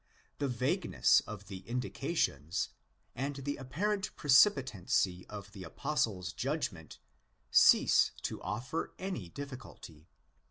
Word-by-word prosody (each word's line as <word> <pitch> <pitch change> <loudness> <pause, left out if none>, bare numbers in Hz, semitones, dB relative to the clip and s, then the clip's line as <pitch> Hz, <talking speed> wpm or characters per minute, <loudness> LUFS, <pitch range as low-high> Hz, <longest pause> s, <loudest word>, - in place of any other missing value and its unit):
The 145 - 0
vagueness 135 +9 +2
of 105 -2 -8
the 95 0 -7
indica 130 +6 -3
tions, 75 - 0 0.4
and 140 +3 -3
the 140 +1 -4
apparent 195 +10 -2
precipitancy 130 - +3
of 100 -1 -9
the 95 -2 -9
Apostle's 90 - -2
judgment, 125 - -3 0.5
cease - - +6
to - - -4
offer 130 +8 -4
any 185 - -4
difficulty. 125 - -10
125 Hz, 110 wpm, -32 LUFS, 95-145 Hz, 0.5 s, cease